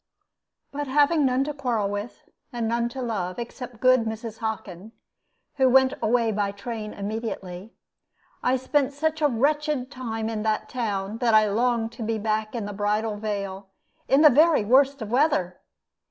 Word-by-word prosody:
But 290 0 -4
having 290 +2 +3
none 255 +1 +1
to 300 +1 -4
quarrel 245 -7 -1
with, 205 +3 -6 0.2
and 235 -3 -2
none 235 +1 0
to 260 +1 -6
love, 190 -6 -3
except 240 0 -7
good 255 -2 +4
Mrs. 220 0 -5
Hockin, 215 -2 -5 0.6
who 265 -1 +4
went 265 +1 +5
away 230 0 +2
by 205 -1 -1
train 215 +1 -6
immediately, 200 -2 -6 0.7
I 255 +1 +2
spent 275 +1 0
such 315 +2 -1
a 300 - +5
wretched 285 +1 0
time 225 -4 -4
in 220 -1 -3
that 215 0 -1
town 210 -3 -3
that 235 -3 +3
I 215 0 +5
longed 230 +1 0
to 235 - -11
be 225 0 -1
back 215 +1 -2
in 225 -3 -3
the 205 - -5
Bridal 210 +1 -1
Veil 200 -2 -4 0.4
in 275 +2 +4
the 305 - +9
very 305 -3 +4
worst 270 +2 +3
of 215 - -8
weather. 245 - +1
230 Hz, 170 wpm, -25 LUFS, 210-260 Hz, 0.7 s, the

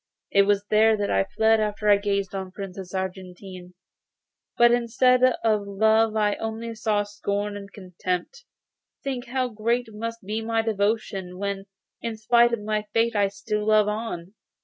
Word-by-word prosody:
It 200 0 +4
was 205 0 +2
here 220 +1 +4
that 205 -1 -1
I 95 0 +2
fled 220 +1 +2
after 210 0 -2
I 205 - +8
had 200 - +2
gazed 200 -2 -1
on 190 -1 -4
the - - -16
Princess 190 -1 -8
Argentine, 185 -1 -6 0.8
but 240 0 +6
instead 245 +1 +3 0.2
of 215 -3 +1
love 220 +2 +3
I 210 -1 +1
only 225 +1 -4
saw 215 -2 0
scorn 205 0 -3
and 200 0 -9
contempt. 185 - -5 0.6
Think 265 -2 -4
how 255 +1 -1
great 230 +1 -1
must 230 +2 -5
be 215 +3 -2
my 225 0 0
devotion, 200 -4 -1
when, 200 0 -3 0.4
in 230 -2 -4
spite 235 +2 +4
of 230 -3 -2
my 210 0 -2
fate, 230 0 +2
I 205 -1 +3
still 210 +2 -3
love 215 -1 +4
on! 210 -4 -4
210 Hz, 170 wpm, -25 LUFS, 200-225 Hz, 0.8 s, I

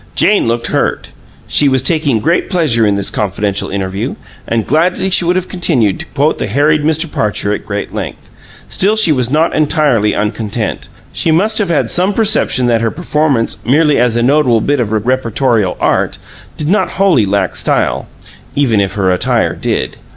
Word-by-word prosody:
Jane 205 - +3
looked 115 0 -1
hurt; - - -1 0.4
she 145 - +2
was 130 -1 +1
taking 145 -6 +1
great 170 +7 0
pleasure 145 - +2
in 100 - +1
this 100 -1 -2
confidential 100 0 -2
interview, 95 0 -3 0.3
and 115 -2 -1
gladly 175 +6 0
would 175 +1 +1
have 185 -1 -1
continued 130 - 0
to - - -7
quote - - 0
the - - -2
harried 150 +6 +2
Mr. 160 +1 +1
Parcher 105 -8 -2
at - - -6
great 100 -1 -4
length. - - -6 0.4
Still, 205 +3 +1
she 215 -7 +3
was 125 -5 0
not 155 +4 +1
entirely 145 -8 +1
uncontent: 105 +1 -3 0.3
she - - -1
must 210 +8 +2
have 200 -4 0
had 165 - 0
some 185 +3 +2
perception 215 - +2
that 115 -2 +2
her 115 - +1
performance 150 -5 -1
merely 150 +2 +2
as 120 -1 +2
a 120 - +1
notable 130 -3 +3
bit 145 +5 0
of 120 - 0
reportorial 115 -2 0
art - - 0 0.4
did 150 - -2
not 205 +6 +1
wholly 175 - +2
lack 95 -2 -1
style, - - -1 0.5
even 120 -8 +2
if 100 - -2
her 95 -3 0
attire 90 - 0
did. - - -3
130 Hz, 175 wpm, -13 LUFS, 110-160 Hz, 0.5 s, Jane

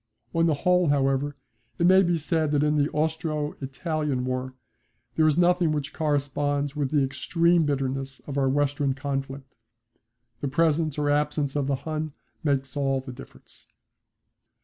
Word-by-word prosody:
On 165 0 +3
the 155 - +2
whole, 180 +4 +2
however, 140 0 +1 0.4
it 170 - +2
may 190 +2 +7
be 175 -2 +2
said 160 0 0
that 145 0 +3
in 150 0 +2
the 145 0 +2
Austro 155 -1 -1
Italian 140 -1 -2
war 130 0 -3 0.6
there 155 +4 +3
is 155 0 +2
nothing 175 -2 +3
which 150 -1 -3
corresponds 145 -1 -1
with 145 -3 -1
the 145 -1 +2
extreme 165 +4 +2
bitterness 135 -1 -2
of 140 - -7
our 135 -1 +2
western 145 0 +1
conflict. 135 -1 -5 0.9
The 145 - -2
presence 155 +1 +1
or 145 -1 +1
absence 145 -1 0
of 140 -2 0
the 140 - +1
Hun 155 -1 -3 0.3
makes 135 -3 0
all 135 -2 +1
the 130 -1 -8
difference. - - -13
145 Hz, 155 wpm, -26 LUFS, 135-155 Hz, 0.9 s, may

